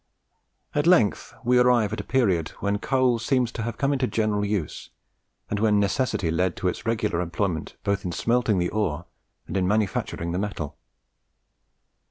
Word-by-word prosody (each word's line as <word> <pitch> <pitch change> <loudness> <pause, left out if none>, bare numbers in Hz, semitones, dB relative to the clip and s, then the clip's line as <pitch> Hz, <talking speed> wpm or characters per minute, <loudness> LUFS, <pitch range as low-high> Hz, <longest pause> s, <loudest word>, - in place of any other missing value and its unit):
At 150 +2 +1
length 140 - +3
we 125 0 +4
arrive 120 -4 +3
at 110 - -3
a - - -3
period 95 -12 +1
when 100 0 0
coal 130 -1 +2
seems 125 +1 +1
to 115 - -5
have 115 +1 -4
come 140 +1 +1
into 130 -2 0
general 110 -3 0
use, 100 -6 -3 0.6
and 105 - -2
when 105 -1 +3
necessity 100 -4 0
led 90 +2 0
to 95 - -2
its 90 - -3
regular 105 -6 0
employment 85 -1 -2
both 100 0 0
in 90 - -3
smelting 115 +1 +1
the 90 -1 +1
ore 90 -6 -1 0.4
and - - -6
in 95 -2 +1
manufacturing 100 -4 -1
the 90 - -1
metal. 95 -8 -4
105 Hz, 170 wpm, -25 LUFS, 90-120 Hz, 0.6 s, we